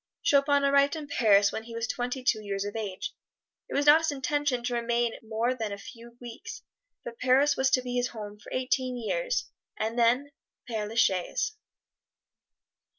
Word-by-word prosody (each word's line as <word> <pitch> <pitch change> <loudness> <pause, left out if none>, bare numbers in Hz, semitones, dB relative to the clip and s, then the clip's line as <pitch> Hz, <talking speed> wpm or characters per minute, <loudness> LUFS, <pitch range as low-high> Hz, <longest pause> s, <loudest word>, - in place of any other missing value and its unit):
Chopin 280 0 +3
arrived 280 +2 +4
in 310 -2 -5
Paris 205 -7 +4
when 220 - -5
he 230 0 -9
was 230 0 -1
twenty 250 0 -3
two 220 -3 +2
years 200 -1 -3
of 205 - -5
age. 215 +5 -4 0.6
It - - -4
was 285 - +2
not 295 +2 +8
his 320 - 0
intention 285 -2 -1
to 245 - -2
remain 235 0 0
more 225 +3 -1
than 225 -4 -4
a 200 - -4
few 235 +3 -12
weeks, 240 -2 -9 0.4
but 235 -1 -8
Paris 265 +3 +4
was 265 0 +2
to 255 -2 +2
be 250 0 -3
his 245 0 +1
home 210 -3 -8
for - - -13
eighteen 255 0 -1
years - - -2 0.3
and 225 +2 -2
then 250 +5 +3 0.4
Pere 220 -3 -3
la 220 - -8
Chaise. 195 - +1
245 Hz, 180 wpm, -28 LUFS, 225-275 Hz, 0.6 s, not